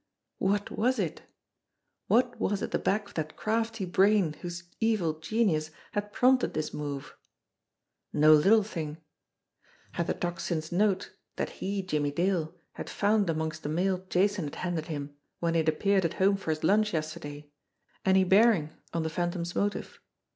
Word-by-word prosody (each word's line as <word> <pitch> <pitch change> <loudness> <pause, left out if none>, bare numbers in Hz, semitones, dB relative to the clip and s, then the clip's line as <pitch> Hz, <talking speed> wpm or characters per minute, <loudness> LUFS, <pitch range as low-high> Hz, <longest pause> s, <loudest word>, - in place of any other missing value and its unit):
What 200 +1 0
was 250 +4 +1
it? - - -2 0.9
What 245 +1 +2
was 200 0 0
at - - -3
the - - 0
back 205 +1 0
of - - -16
that 155 -1 -4
crafty 225 -1 -1
brain 190 -2 +3
whose 175 0 -6 0.2
evil 195 -9 +1
genius 160 -3 +1 0.2
had 205 0 -3
prompted 255 +3 +3
this 155 - -2
move? 145 -1 -5 1.0
No 155 +1 +6
little 200 +8 +6
thing! 160 -7 -5 0.9
Had 170 -1 -2
the - - 0
Tocsin's 170 -2 -3
note 195 +1 +1 0.2
that - - -2
he, 195 0 -1
Jimmie 150 -6 0
Dale, 170 +1 0 0.2
had - - -7
found 205 -2 +2
amongst 160 0 -2
the 145 - -4
mail 185 +3 0
Jason 195 -1 +2
had 145 - -6
handed 175 -4 -2
him 145 -2 -5 0.3
when 170 -1 0
he 165 - +3
had 160 0 +2
ap 155 - -1
peared 200 -2 +3
at 170 - -1
home 195 +1 +3
for 195 -4 -6
his 155 0 -1
lunch 210 +4 +3
yesterday, 150 -2 -5 0.5
any 190 0 +4
bearing 190 -5 +4 0.2
on 165 - 0
the 160 - -1
Phantom's 175 0 -2
motive? 205 0 -2
175 Hz, 165 wpm, -29 LUFS, 155-205 Hz, 1.0 s, No